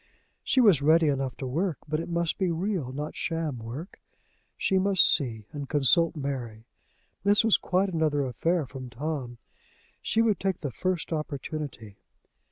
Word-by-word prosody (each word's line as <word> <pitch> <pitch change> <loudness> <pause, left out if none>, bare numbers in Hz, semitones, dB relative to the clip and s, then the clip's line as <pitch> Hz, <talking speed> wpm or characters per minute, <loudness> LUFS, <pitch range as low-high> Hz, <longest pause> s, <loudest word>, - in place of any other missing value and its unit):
She 260 - +2
was 195 - +5
ready 160 +2 +5
enough 135 -2 -2
to 135 - -5
work, 160 +6 -1
but 155 +1 -1
it 165 - -5
must 170 -1 -1
be 190 -2 +1
real, 170 -5 -2
not 150 +3 -5
sham 160 -6 -2
work. 125 - -8 0.6
She 190 - +2
must 195 0 +4
see 115 -7 -3
and 145 -2 -6
consult 160 +4 +3
Mary! 125 -6 -5 0.6
This 205 +2 +4
was 225 - +6
quite 190 +2 +1
another 155 -5 +1
affair 160 +6 0
from 130 -1 -8
Tom! 130 -1 -4 0.6
She 225 - +2
would 215 -6 +2
take 190 -2 -1
the 145 - -3
first 180 +3 -2
opportunity. 145 -7 -5
155 Hz, 160 wpm, -27 LUFS, 135-175 Hz, 0.6 s, was